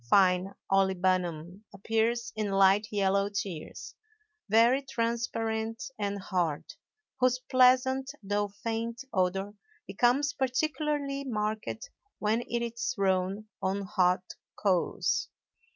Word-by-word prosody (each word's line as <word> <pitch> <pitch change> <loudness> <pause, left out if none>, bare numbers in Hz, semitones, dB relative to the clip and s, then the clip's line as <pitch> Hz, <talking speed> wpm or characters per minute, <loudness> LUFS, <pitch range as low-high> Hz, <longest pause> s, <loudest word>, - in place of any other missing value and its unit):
Fine 185 +1 +4 0.2
olibanum 185 -2 +1
appears 225 +3 -1
in 215 -1 -1
light 195 +2 +4
yellow 200 -1 +2
tears, 195 -6 -5 0.6
very 230 +5 +5
transparent 230 -3 -2 0.2
and 200 -1 -1
hard, 175 -6 -1 0.5
whose 255 -1 +3
pleasant 255 +1 +3
though 205 +1 0 0.2
faint 230 +2 -3
odor 190 +1 0 0.3
becomes 255 +7 +2
particularly 285 +1 -1
marked 220 - -3 0.3
when 215 +2 +1
it 235 0 -1
is 235 +2 -3
thrown 195 +1 0
on 195 +1 -1
hot 185 -2 +2 0.3
coals. 185 -4 +1
210 Hz, 100 wpm, -29 LUFS, 190-235 Hz, 0.6 s, very